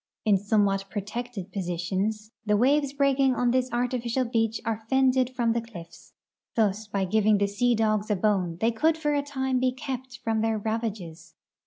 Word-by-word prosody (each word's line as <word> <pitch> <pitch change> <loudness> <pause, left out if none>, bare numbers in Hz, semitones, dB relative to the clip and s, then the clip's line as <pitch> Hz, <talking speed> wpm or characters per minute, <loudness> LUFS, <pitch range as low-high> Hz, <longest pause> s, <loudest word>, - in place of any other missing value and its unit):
In 205 -3 +4
somewhat 200 -1 +1
protected 210 0 -5
positions 195 +4 -2
the 210 -1 +2
waves 280 +4 +3
l>reaking 275 -2 +2
on 245 -1 +2
this 255 0 0
artificial 245 +1 -1
beach 225 -2 0
are 225 -1 -2
fended 260 -1 +3
from 240 -3 0
the 235 - 0
cliffs. 175 -8 -12 0.4
Thus 215 -1 +1
by 200 -2 -1
giving 215 +2 +3
the 200 - +2
sea 235 +5 +1
dogs 215 -1 +1
a 210 - +2
bone 185 -4 0
they 225 +3 +2
could 315 +8 +2
for 295 -2 0
a 290 - +2
time 265 -2 -1
be 255 0 +2
kept 260 -1 -6
from 225 -1 0
their 225 0 +1
ravages. 210 -7 -4
225 Hz, 175 wpm, -26 LUFS, 205-255 Hz, 0.4 s, In